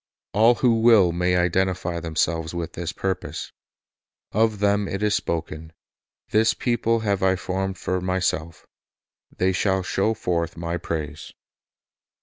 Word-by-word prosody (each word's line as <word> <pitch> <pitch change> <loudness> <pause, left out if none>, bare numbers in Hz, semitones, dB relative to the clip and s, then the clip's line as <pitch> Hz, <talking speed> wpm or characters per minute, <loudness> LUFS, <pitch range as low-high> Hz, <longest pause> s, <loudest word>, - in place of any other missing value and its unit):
All 115 +4 +5
who 115 -2 +2
will 110 -7 +6
may 90 +1 +1
identify 90 -1 0
themselves 80 0 -1
with 85 -2 -4
this 85 0 -4
purpose. 95 +2 -4 0.8
Of 110 0 +2
them 100 0 +1
it 100 +2 -3
is 105 -1 +2
spoken, 80 -3 -3 0.6
"This 110 +1 +3
people 115 -2 0
have 100 -3 0
I 95 0 +3
formed 95 +1 -3
for 90 +2 -2
Myself; 90 -3 -2 0.7
they 95 +1 +2
shall 95 +1 +1
show 100 +4 0
forth 85 -5 -2
My 85 +1 -3
praise." 75 -3 -5
95 Hz, 135 wpm, -24 LUFS, 85-105 Hz, 0.8 s, will